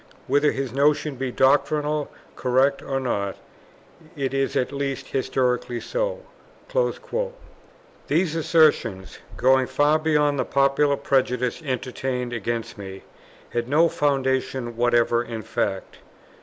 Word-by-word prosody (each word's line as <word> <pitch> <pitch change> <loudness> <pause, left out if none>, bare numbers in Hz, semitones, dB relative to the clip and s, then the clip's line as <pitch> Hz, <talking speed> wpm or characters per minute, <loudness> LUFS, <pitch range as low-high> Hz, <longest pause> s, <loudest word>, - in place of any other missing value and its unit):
Whether 145 +2 +3
his 135 -3 -4
notion 145 +2 +2
be 130 0 -3
doctrinally 145 +3 +2 0.3
correct 130 +2 +2
or 135 -1 -2
not, 100 -7 -2 0.8
it 135 -2 -2
is 135 0 0
at 125 - 0
least 140 -1 -3
historically 125 -2 0
so." - - -2 1.9
These 165 +1 +1
assertions, 155 - +2 0.2
going 130 0 +4
far 150 +2 +3
beyond 150 -2 +2
the - - +2
popular 140 +1 +2
prejudice 125 0 0
entertained 130 -2 -3
against 115 -1 -3
me, 95 -1 -8 0.5
had 120 +1 -2
no 160 +4 +5
foundation 130 -4 0
whatever 120 0 +2
in 115 -2 -6
fact. - - -3
135 Hz, 115 wpm, -24 LUFS, 125-145 Hz, 1.9 s, no